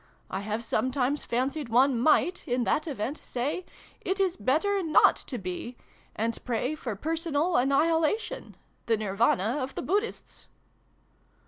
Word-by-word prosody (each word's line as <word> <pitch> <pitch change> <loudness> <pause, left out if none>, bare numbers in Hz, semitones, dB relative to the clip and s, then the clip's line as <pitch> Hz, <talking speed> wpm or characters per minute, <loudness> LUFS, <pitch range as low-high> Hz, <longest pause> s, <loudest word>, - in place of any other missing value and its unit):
I 190 - -2
have 215 +3 -3
sometimes 260 +5 0
fancied 265 +3 -2
one 250 +2 +4
might, 315 +7 +2
in 245 0 +1
that 305 +6 0
event, 270 0 -3
say 285 +9 -3 0.4
'It 385 +1 -1
is 375 -3 +2
better 320 - +1
not 320 -4 +5
to 255 - -6
be,' 195 +5 -5 0.4
and 230 +1 -2
pray 250 +4 -1
for 245 -8 -4
personal 325 - 0
anni 275 +4 +4
hilation 335 +10 -1 0.3
the 225 -1 +3
Nirvana 210 +3 +1
of 260 +1 -4
the - - -3
Buddhists." 415 +4 -2
265 Hz, 140 wpm, -28 LUFS, 230-320 Hz, 0.4 s, not